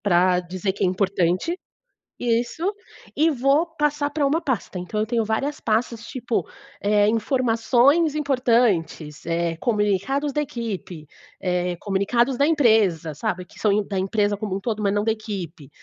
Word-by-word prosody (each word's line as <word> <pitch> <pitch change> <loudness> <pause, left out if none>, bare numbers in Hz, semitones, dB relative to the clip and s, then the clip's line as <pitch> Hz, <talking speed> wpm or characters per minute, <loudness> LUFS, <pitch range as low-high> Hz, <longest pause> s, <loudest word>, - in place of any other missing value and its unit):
pra 180 -2 +3
dizer 185 +2 -3
que - - -6
é - - +4
importante. 185 - 0 0.6
Isso, 240 +7 -1 0.5
e 320 +2 +4
vou 280 +4 +2
passar 295 -1 +1
pra 295 0 0
uma 310 +5 +1
pasta. 240 - -2
Então 195 +4 -4
eu 215 - +1
tenho 230 0 0
várias 275 +8 -2
pastas, 225 +1 -1
tipo, 240 - -2 0.3
eh, 205 0 +3
"informações 250 +6 +2
importantes", 230 - +1
eh, 170 0 -1
"comunicados 215 - 0
da 295 - +1
equipe", 205 - -5 0.3
eh, 180 -1 -1
"comunicados 235 +6 +1
da 285 +3 +3
empresa", 220 - +3
sabe, 180 +5 -3
que - - -17
são 210 - +2
im 210 +1 +2
da 195 -2 -2
empresa 205 +1 +1
como 200 -2 -4
um - - -2
todo, 215 0 -3
mas 200 -1 +1
não 205 - +1
da 225 - +2
equipe. 190 - -6
215 Hz, 160 wpm, -23 LUFS, 185-255 Hz, 0.6 s, é